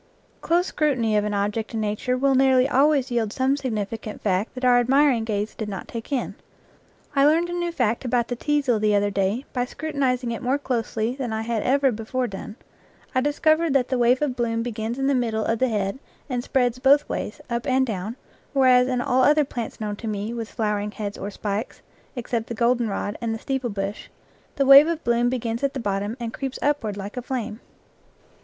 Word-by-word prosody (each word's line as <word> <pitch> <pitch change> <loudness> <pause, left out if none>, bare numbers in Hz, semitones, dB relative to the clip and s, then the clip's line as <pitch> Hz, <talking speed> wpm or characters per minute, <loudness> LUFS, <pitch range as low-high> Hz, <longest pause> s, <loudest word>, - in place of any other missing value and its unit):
Close 345 +2 +2
scrutiny 255 -11 0
of 210 0 +2
an 210 - -2
object 210 +3 -2
in - - -1
nature 215 +4 -1
will 275 +1 +2
nearly 260 -1 +4
always 280 -1 +3
yield 230 -3 0
some 265 +3 +1
significant 220 -4 -4
fact 195 +3 -1
that 255 0 -3
our 245 -1 +5
admir 275 +3 +4
ing 225 - -2
gaze 210 -1 -2
did 215 -2 -5
not 195 -3 -6
take 230 +4 -7
in. 265 -3 -1 0.8
I 275 - +4
learned 330 +4 +3
a - - -3
new 345 -1 -1
fact 240 -8 0
about 240 -1 0
the 245 - -3
teazel 275 -4 +1
the 210 -1 +3
other 205 0 +2
day 200 +7 0
by 245 -1 0
scrutinizing 265 -4 -2
it 230 - -4
more, 260 +2 +1
closely 235 -4 -2
than 260 -4 -4
I 220 0 -2
had 225 -1 -1
ever 270 +2 +3
before 240 +3 -2
done; 210 -1 -7 0.6
I 255 - +2
discovered 310 +2 +2
that 260 -3 +2
the 260 - 0
wave 245 +4 +3
of 270 -4 -1
bloom 230 -2 -1
begins 230 0 -4
in 270 - -1
the 280 - +3
middle 225 -4 0
of 225 0 0
the 260 - +2
head 205 +1 -2 0.3
and 250 -4 -2
spreads 250 -2 0
both 275 +3 +4
ways, - - -4
up 235 +2 -3
and 260 0 +3
down, 215 -1 -4 0.4
whereas 255 -2 +5
in 250 -1 0
all 260 -1 +2
other 295 +3 +4
plants 235 -4 -6
known 210 -1 -3
to 225 - -6
me 210 +1 -3
with 230 -2 -5
flowering 210 -2 -1
heads 205 -2 -5
or 200 - -5
spikes, 205 +1 -4 0.3
except 235 -2 -3
the 235 - -5
goldenrod 235 -3 0
and 225 -1 -1
the - - -4
steeple 265 +1 -2
bush, 200 0 -4 0.5
the 275 - +1
wave 275 +3 +9
of 335 -1 -2
bloom 240 0 +2
begins 235 -2 -2
at 280 0 0
the - - -2
bottom 205 +1 -2
and 230 -1 -4
creeps 270 -2 -4
upward 255 -9 0
like 200 +4 -7
a - - -1
flame. 235 -3 -4
245 Hz, 210 wpm, -24 LUFS, 220-265 Hz, 0.8 s, wave